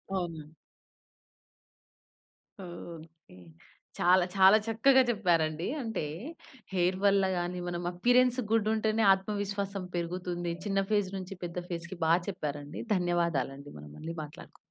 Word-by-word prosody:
అవునండి. 165 Hz, -4 st, -4 dB, 2.1 s
ఓకే. 165 Hz, -, -11 dB, 0.6 s
చాలా, 180 Hz, 0 st, +5 dB
చాలా 195 Hz, +2 st, +7 dB
చక్కగా 260 Hz, +4 st, +5 dB
చెప్పారండి 170 Hz, -6 st, +1 dB
అంటే 225 Hz, -8 st, -3 dB, 0.7 s
హెయిర్ 180 Hz, 0 st, +1 dB
వల్లగాని, 185 Hz, -3 st, +2 dB
మనం 175 Hz, 0 st, -3 dB
అపియరెన్స్ 245 Hz, +7 st, +3 dB
గుడ్ 225 Hz, -2 st, +3 dB
ఉంటేనే 220 Hz, 0 st, +1 dB
ఆత్మవిశ్వాసం 200 Hz, -1 st, -3 dB
పెరుగుతుంది. 175 Hz, 0 st, -3 dB
చిన్న 195 Hz, -1 st, +1 dB
ఫేజ్ 205 Hz, -3 st, +2 dB
నుంచి 190 Hz, +1 st, -7 dB
పెద్ద 175 Hz, +1 st, -5 dB
ఫేస్‌కి 170 Hz, +1 st, -5 dB
బా 160 Hz, -, +5 dB, 0.2 s
చెప్పారండి 150 Hz, -5 st, -5 dB
ధన్యవాదాలండి! 165 Hz, -6 st, -1 dB
మనం 75 Hz, 0 st, -11 dB
మళ్ళీ 165 Hz, +1 st, -6 dB
మాట్లాడుకుందాం. 155 Hz, +4 st, -12 dB
180 Hz, 105 wpm, -30 LUFS, 170-200 Hz, 2.1 s, చాలా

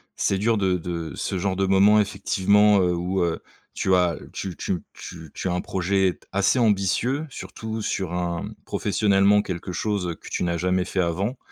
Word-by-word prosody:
c'est 100 Hz, -, +1 dB
dur 115 Hz, +2 st, +2 dB
de 95 Hz, -2 st, +1 dB
de 85 Hz, -1 st, -5 dB
ce 95 Hz, -, -3 dB
genre 95 Hz, +1 st, -1 dB
de 95 Hz, -, +1 dB
moment 100 Hz, +2 st, +5 dB
effectivement, 100 Hz, +1 st, +3 dB
heu, 90 Hz, -1 st, +2 dB
où, 90 Hz, +1 st, -1 dB
heu, 85 Hz, -1 st, -1 dB, 0.4 s
tu 95 Hz, -, +1 dB
as 90 Hz, -3 st, +2 dB, 0.2 s
tu 95 Hz, -3 st, -5 dB
tu 90 Hz, -, -2 dB
tu 80 Hz, -3 st, -10 dB
tu -, -, -3 dB
as 90 Hz, -, 0 dB
un 90 Hz, -, -1 dB
projet 95 Hz, 0 st, 0 dB
assez 100 Hz, +5 st, +2 dB
ambitieux, 115 Hz, -, +1 dB
surtout 110 Hz, -3 st, -6 dB
sur 95 Hz, -4 st, -2 dB
un 85 Hz, -1 st, -2 dB, 0.2 s
professionnellement 100 Hz, 0 st, +3 dB
quelque 90 Hz, 0 st, -5 dB
chose, 100 Hz, 0 st, -1 dB
heu, 85 Hz, -, -3 dB
que -, -, -13 dB
tu -, -, -2 dB
n'as 85 Hz, -1 st, 0 dB
jamais 90 Hz, +1 st, +1 dB
fait 95 Hz, -, -3 dB
avant, 95 Hz, +9 st, -1 dB
95 Hz, 190 wpm, -24 LUFS, 90-100 Hz, 0.4 s, moment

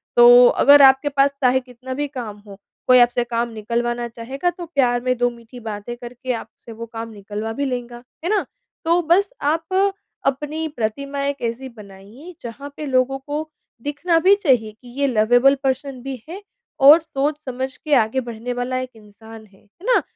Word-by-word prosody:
तो 245 Hz, +1 st, +8 dB
अगर 285 Hz, +3 st, +6 dB
आपके 270 Hz, +2 st, +6 dB
पास 275 Hz, 0 st, +2 dB
चाहे 255 Hz, +1 st, +4 dB
कितना 255 Hz, 0 st, -9 dB
भी 290 Hz, +2 st, -2 dB
काम 240 Hz, -7 st, -7 dB
हो, 200 Hz, -1 st, -11 dB, 0.3 s
कोई 255 Hz, 0 st, +7 dB
आपसे 245 Hz, 0 st, +3 dB
काम 235 Hz, 0 st, -2 dB
निकलवाना 235 Hz, +2 st, -2 dB
चाहेगा, 250 Hz, +8 st, -3 dB
तो 350 Hz, 0 st, -7 dB
प्यार 250 Hz, -7 st, +1 dB
में 255 Hz, 0 st, 0 dB
2 245 Hz, +1 st, +2 dB
मीठी 235 Hz, +1 st, -13 dB
बातें 220 Hz, +1 st, -6 dB
करके 245 Hz, +1 st, -6 dB
आपसे 230 Hz, 0 st, -9 dB
वो 230 Hz, +1 st, -7 dB
काम 230 Hz, 0 st, -7 dB
निकलवा 210 Hz, +2 st, -6 dB
भी 280 Hz, +5 st, -2 dB
लेगा। 245 Hz, -2 st, -5 dB, 0.2 s
है 345 Hz, -, -1 dB
ना? 420 Hz, 0 st, +1 dB, 0.4 s
तो 340 Hz, +2 st, +3 dB
बस 350 Hz, +5 st, +2 dB
आप 325 Hz, +6 st, 0 dB, 0.4 s
अपनी 295 Hz, +4 st, -2 dB
प्रतिमा 275 Hz, +5 st, -3 dB
एक 280 Hz, 0 st, -3 dB
ऐसी 235 Hz, +3 st, -4 dB
बनाइए 215 Hz, -, -13 dB
जहाँ 260 Hz, +5 st, -8 dB
पे 305 Hz, -, -5 dB
लोगों 265 Hz, 0 st, +1 dB
को 295 Hz, +3 st, -5 dB, 0.3 s
दिखना 295 Hz, +5 st, 0 dB
भी 380 Hz, +4 st, +5 dB
चाहिए 255 Hz, -, +1 dB
कि 220 Hz, +4 st, -19 dB
ये 280 Hz, -, +2 dB
लवेबल 245 Hz, +3 st, +4 dB
पर्सन 265 Hz, -1 st, -2 dB
भी 270 Hz, -1 st, -6 dB
है 375 Hz, +4 st, -7 dB, 0.4 s
और 295 Hz, +4 st, +8 dB
सोच 295 Hz, -2 st, -2 dB
समझ 260 Hz, 0 st, -4 dB
के 300 Hz, -, -3 dB
आगे 225 Hz, +1 st, +2 dB
बढ़ने 235 Hz, +2 st, -5 dB
वाला 245 Hz, +1 st, -2 dB
एक 255 Hz, 0 st, -5 dB
इंसान 220 Hz, +1 st, -14 dB
है। 195 Hz, -2 st, -24 dB
है 215 Hz, -, -19 dB
ना? -, -, +3 dB
255 Hz, 185 wpm, -21 LUFS, 230-285 Hz, 0.4 s, तो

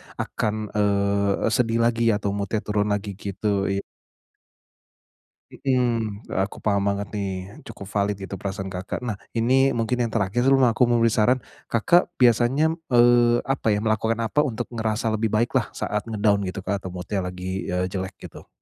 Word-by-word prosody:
akan, 110 Hz, 0 st, -3 dB
eee 100 Hz, -1 st, +1 dB
eee, -, -, +2 dB
sedih 115 Hz, 0 st, +2 dB
lagi 115 Hz, -1 st, +2 dB
atau 100 Hz, -1 st, -2 dB
mood-nya 100 Hz, +1 st, -2 dB
turun 105 Hz, 0 st, 0 dB
lagi 100 Hz, 0 st, -1 dB
gitu, 100 Hz, 0 st, -1 dB
iya. 100 Hz, 0 st, -1 dB, 1.7 s
Mhm, 115 Hz, -5 st, -1 dB, 0.2 s
aku 95 Hz, -, -3 dB
paham 100 Hz, -2 st, 0 dB
banget 100 Hz, 0 st, -2 dB
nih, 100 Hz, -2 st, -2 dB, 0.4 s
cukup 100 Hz, -, -9 dB
valid 100 Hz, 0 st, 0 dB
gitu 95 Hz, -1 st, -8 dB
perasaan 95 Hz, 0 st, -4 dB
Kakak. 90 Hz, +2 st, -4 dB
Nah, 115 Hz, -, -1 dB, 0.2 s
ini 130 Hz, +4 st, +4 dB
mungkin 120 Hz, +2 st, 0 dB
yang 120 Hz, -, 0 dB
terakhir 110 Hz, +1 st, 0 dB
sebelum 135 Hz, 0 st, +4 dB
aku 125 Hz, +1 st, +3 dB
memberi 115 Hz, -1 st, +3 dB
saran, 120 Hz, +4 st, +3 dB, 0.3 s
Kakak 170 Hz, +11 st, +3 dB
biasanya 125 Hz, +6 st, +3 dB
m -, -, -6 dB
eee, 120 Hz, -1 st, +4 dB
apa 135 Hz, -3 st, 0 dB
ya, 105 Hz, -, +3 dB
melakukan 110 Hz, +1 st, 0 dB
apa 145 Hz, +6 st, +2 dB
untuk 120 Hz, -5 st, -2 dB
ngerasa 110 Hz, 0 st, -1 dB
lebih 110 Hz, +1 st, 0 dB
baiklah 115 Hz, +3 st, +1 dB
saat 105 Hz, 0 st, -3 dB
nge-down 105 Hz, -2 st, +2 dB
gitu 95 Hz, 0 st, -7 dB
Kak, 100 Hz, -1 st, -1 dB
atau 95 Hz, -, -6 dB
mood-nya 90 Hz, +2 st, -3 dB
lagi, 90 Hz, +1 st, -4 dB
eee, 90 Hz, 0 st, 0 dB
jelek, 95 Hz, 0 st, -4 dB
gitu? -, -, -12 dB
110 Hz, 170 wpm, -24 LUFS, 100-120 Hz, 1.7 s, ini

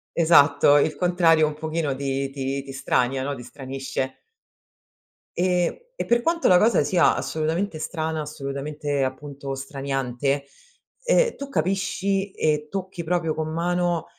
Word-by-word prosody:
Esatto, 145 Hz, -3 st, +5 dB
il 155 Hz, +1 st, +2 dB
contrario 170 Hz, -2 st, +4 dB
un 150 Hz, -, -2 dB
pochino 155 Hz, -2 st, -2 dB
ti 135 Hz, 0 st, -2 dB
ti 135 Hz, 0 st, -3 dB
ti 135 Hz, -, -9 dB
strania, 130 Hz, -1 st, 0 dB
no, 140 Hz, 0 st, -2 dB
ti 125 Hz, -, -9 dB
stranisce. 135 Hz, 0 st, -5 dB, 1.3 s
E 180 Hz, -, +1 dB, 0.2 s
e -, -, -1 dB
per 235 Hz, 0 st, +3 dB
quanto 335 Hz, +5 st, +1 dB
la 180 Hz, -, +7 dB
cosa 220 Hz, -2 st, +4 dB
sia 165 Hz, +4 st, +3 dB
assolutamente 160 Hz, +3 st, -2 dB
strana, 160 Hz, 0 st, -3 dB
assolutamente 145 Hz, 0 st, -3 dB
appunto 140 Hz, +1 st, -5 dB
straniante, 135 Hz, 0 st, -2 dB, 0.6 s
ehm, -, -, +3 dB
tu 280 Hz, 0 st, -7 dB
capisci 195 Hz, -2 st, -1 dB
e 150 Hz, -3 st, 0 dB
tocchi 190 Hz, -1 st, -5 dB
proprio 165 Hz, -1 st, 0 dB
con 155 Hz, 0 st, -3 dB
mano, 175 Hz, 0 st, 0 dB
155 Hz, 135 wpm, -24 LUFS, 140-175 Hz, 1.3 s, la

